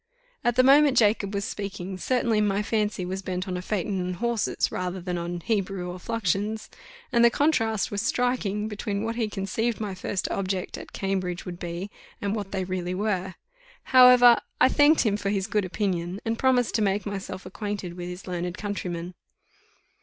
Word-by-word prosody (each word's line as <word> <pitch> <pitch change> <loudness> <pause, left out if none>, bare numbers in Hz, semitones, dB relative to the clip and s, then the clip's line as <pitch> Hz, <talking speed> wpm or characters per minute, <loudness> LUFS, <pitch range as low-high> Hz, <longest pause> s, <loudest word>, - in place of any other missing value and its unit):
At 240 -1 +2
the 255 - +5
moment 275 0 +6
Jacob 210 -3 +3
was 200 0 -2
speaking, 195 -2 -5
certainly 235 -3 +1
my 205 0 +1
fancy 210 -3 -1
was 190 +2 -4
bent 185 0 -3
on 185 - -3
a 180 - -3
phaeton 195 0 -2
and 180 0 -3
horses, 235 +2 0
rather 180 +1 -3
than 180 0 -3
on 175 0 -4
Hebrew 195 -3 -1
or 180 - -8
fluxions, 215 +1 -2 0.4
and 235 -1 +4
the 235 - +8
contrast 225 -7 +1
was 205 -1 -1
striking, 225 -4 0
between 205 -1 -3
what 225 +1 -2
he 225 -2 -1
conceived 210 +4 -2
my 210 -3 -3
first 185 +1 -3
objects 190 -1 -2
at - - -11
Cambridge 185 -2 -2
would 175 -2 -7
be, 175 +3 -5 0.3
and 200 +1 -1
what 200 -3 -5
they 190 -1 -1
really 185 -1 -3
were. 190 -2 -1 0.6
However, 250 -2 +9 0.2
I - - +6
thanked 295 +3 +5
him 210 -3 +1
for 200 -1 -2
his 195 -2 0
good 210 -1 0
opinion, 185 -1 -2
and 225 0 -1
promised 255 -3 +3
to 225 - +1
make 200 -1 +1
myself 195 -2 -5
acquainted 200 -2 -5
with 175 0 -6
his 180 +1 -8
learned 180 0 -3
countryman. 180 -4 -4
200 Hz, 185 wpm, -26 LUFS, 185-225 Hz, 0.6 s, However